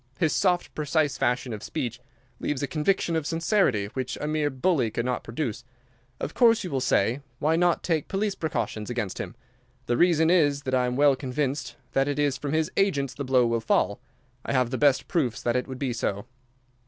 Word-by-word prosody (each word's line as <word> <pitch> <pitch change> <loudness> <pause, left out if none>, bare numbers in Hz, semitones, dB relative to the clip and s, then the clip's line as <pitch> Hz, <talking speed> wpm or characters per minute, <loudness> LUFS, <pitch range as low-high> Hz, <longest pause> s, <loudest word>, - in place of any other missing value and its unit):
His 160 -4 +1
soft, 180 -2 +1
precise 150 -1 0
fashion 125 -1 0
of 105 - -6
speech 125 -4 -4 0.4
leaves 145 -2 -2
a - - 0
conviction 165 +4 0
of 160 -2 -1
sincerity 165 - +1
which 130 -1 -3
a - - -3
mere 150 -1 +1
bully 130 -2 +1
could 120 +2 -3
not 125 -1 -1
produce. 120 -1 -4 0.6
Of 150 - -4
course, 230 -2 +4
you 180 - -5
will 135 -2 0
say: 125 +1 +1 0.2
'Why 155 +4 +2
not 175 0 +2
take 160 -4 0
police 200 +1 -1
precautions 145 - -3
against 115 -6 -3
him?' - - -5 0.5
the 120 - 0
reason 165 -2 +4
is 145 -5 +3
that 130 - -3
I 125 -1 +3
am 125 - -2
well 140 0 +5
convinced 135 +1 -3 0.2
that 135 +1 +2
it 145 -1 -1
is 145 -2 +1
from 145 0 -4
his 160 0 +1
agents 140 -10 +1
the 140 - -5
blow 130 -2 +3
will 115 -1 0
fall. 100 -2 +1 0.4
I - - -3
have 125 -2 +2
the 130 - -1
best 145 -3 +3
proofs 135 - -1
that 120 - +1
it 125 - 0
would 130 -1 -6
be 130 -2 -2
so." 100 -3 -2
140 Hz, 205 wpm, -26 LUFS, 125-160 Hz, 0.6 s, well